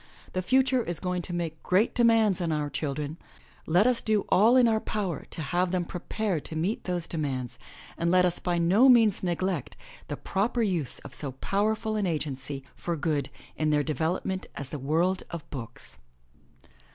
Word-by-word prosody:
The 185 - 0
future 260 +4 +3
is 175 -6 -3
going 180 -1 -2
to 175 - -7
make 170 -2 -3
great 190 +5 +2
demands 225 -5 +4
on 170 -2 0
our 150 -1 -1
children. 145 +2 -3 0.5
Let 180 +6 +4
us 250 -2 +3
do 215 -2 +1
all 225 +6 +5
in 250 -2 +6
our 220 -1 +3
power 200 -8 -3
to - - -5
have 175 +5 +1
them 180 -2 0
prepared 180 -1 -2
to 160 - -5
meet 180 +8 -1
those 175 -2 -2
demands 135 -7 -3 0.4
and 170 - +1
let 180 +1 +5
us 175 -1 0
by 175 -1 0
no 190 +10 +5
means 225 -5 +5
neglect 180 -4 -2 0.3
the - - -4
proper 230 +4 0
use 170 - 0
of - - -9
so 140 -3 -3
powerful 215 - 0
an 205 -3 0
agency 140 -4 -3
for 170 - -3
good 145 -3 -1 0.3
in 155 0 0
their 150 -1 +3
development 165 +5 -2
as 140 -2 -6
the 150 - -5
world 165 +7 +1
of 170 -3 -7
books. 115 - -6
175 Hz, 180 wpm, -28 LUFS, 155-205 Hz, 0.5 s, in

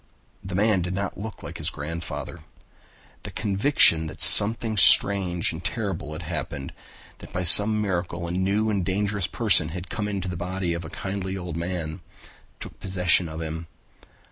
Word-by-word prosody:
The 95 -1 -7
man 105 -1 +1
did 90 +2 -4
not 100 -1 -5
look 110 +1 -8
like - - -9
his - - -1
grandfather. 85 +3 -7 0.8
The - - -9
conviction 100 - +2
that 75 - -10
something 110 +1 +5
strange 95 -3 +6
and 80 +2 -9
terrible 95 -6 -4
had 80 +2 -8
happened, 80 -4 -6 0.5
that - - -13
by 90 - -4
some 105 +5 +7
miracle 85 -4 -3
a - - -5
new 100 +4 -1
and 100 -3 -1
dangerous 100 +1 -2
person 100 -9 +1
had 90 +2 -8
come 105 -2 -4
into 100 -2 -4
the 90 - -5
body 90 0 -3
of 85 - -5
the 80 - -9
kindly 95 +1 -5
old 90 -3 -7
man, 85 -1 -5 0.6
took - - -10
possession 90 -2 +1
of 80 +1 -7
him. 80 +1 -7
90 Hz, 170 wpm, -24 LUFS, 85-100 Hz, 0.8 s, some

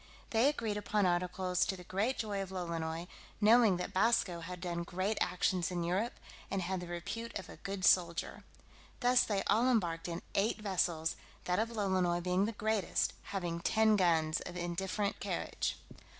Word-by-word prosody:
They 230 +5 +4
agreed 225 -8 -2
upon 210 -1 +1
articles 180 +1 +1
to 190 - -2
the 180 - -10
great 200 +9 -1
joy 205 -3 -2
of 195 - -5
Lolonois, 170 -2 -3 0.3
knowing 220 -2 +6
that 180 - -4
Basco 190 -4 +2
had 180 +2 -7
done 170 -1 -3
great 185 +5 -1
actions 180 -1 +1
in 175 -2 -2
Europe, 195 +8 0 0.3
and 195 -2 -1
had 185 +1 -2
the 180 - -7
repute 175 +7 -5
of 190 -2 -8
a - - -10
good 195 -2 -3
soldier. 170 -1 +2 0.6
Thus 245 +1 +5
they 200 -2 0
all 235 +4 +3
embarked 175 -9 +1
in 170 0 -5
eight 210 +3 +1
vessels, 175 -5 0 0.3
that 180 +1 0
of 225 +1 0
Lolonois 190 -6 +1
being 180 +2 +2
the 225 - -1
greatest, 215 -2 0
having 175 -4 -3
ten 220 +4 +3
guns 165 -4 +2
of 180 - -7
indifferent 190 +4 -2
carriage. - - -2
185 Hz, 170 wpm, -33 LUFS, 175-210 Hz, 0.6 s, knowing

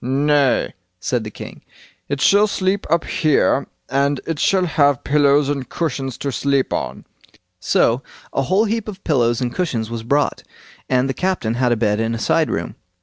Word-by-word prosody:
"Nay", 140 +1 +2 0.3
said 120 +4 -1
the 110 - -6
king, - - -10 0.5
"it 140 0 -2
shall 205 +6 +5
sleep 195 0 -1
up 170 +1 +2
here, 155 -5 +1 0.2
and 140 +1 +1
it 165 -3 -3
shall 190 -2 +2
have 145 -5 +2
pillows 145 -1 +3
and 140 -3 -3
cushions 135 -5 -3
to 140 - -3
sleep 140 0 0
on." - - -4 0.5
So 115 +6 +2 0.3
a - - +1
whole 190 +10 +2
heap 225 0 -2
of 200 -2 -8
pillows 120 -6 +1
and 120 -1 -2
cushions 120 -12 -2
was 115 -1 -4
brought, 140 +6 0 0.5
and 130 0 +2
the 135 - -1
captain 180 -12 -1
had 125 0 +1
a - - +3
bed 105 -1 +1
in 115 +1 -1
a - - -3
side - - +1
room. - - -3
140 Hz, 180 wpm, -20 LUFS, 125-165 Hz, 0.5 s, shall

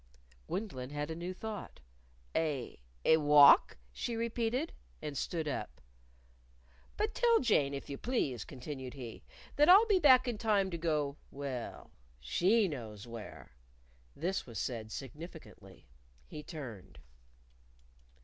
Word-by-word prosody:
Gwendolyn 135 - -4
had 145 +2 -4
a - - -4
new 175 +2 -4
thought. 210 +2 -7 0.6
"A 150 -6 -1 0.3
a 160 - +6
walk?" 145 - +7 0.2
she 235 - -3
repeated. 235 +5 -1 0.3
And 150 -2 -5
stood 160 +3 -2
up. 145 - -4 1.2
"But 435 +1 0
tell 470 -2 +4
Jane, 145 - +2
if 140 - -7
you 140 - -6
please," 140 - -1
continued 130 0 -7
he, 120 -5 -8 0.4
"that 295 +3 +5
I'll 400 +5 +9
be 410 -4 +3
back 260 -5 +6
in 235 -4 -2
time 205 -4 +2
to 170 - -3
go 150 -3 0
well, 135 -4 -6 0.3
she 185 - +2
knows 115 - -7
where." 115 -3 -9 0.6
This 185 -2 -2
was 115 - -8
said 110 -3 -3
significantly. 150 +8 -10 0.4
He 150 - -8
turned. 115 - -9
155 Hz, 130 wpm, -33 LUFS, 130-220 Hz, 1.2 s, I'll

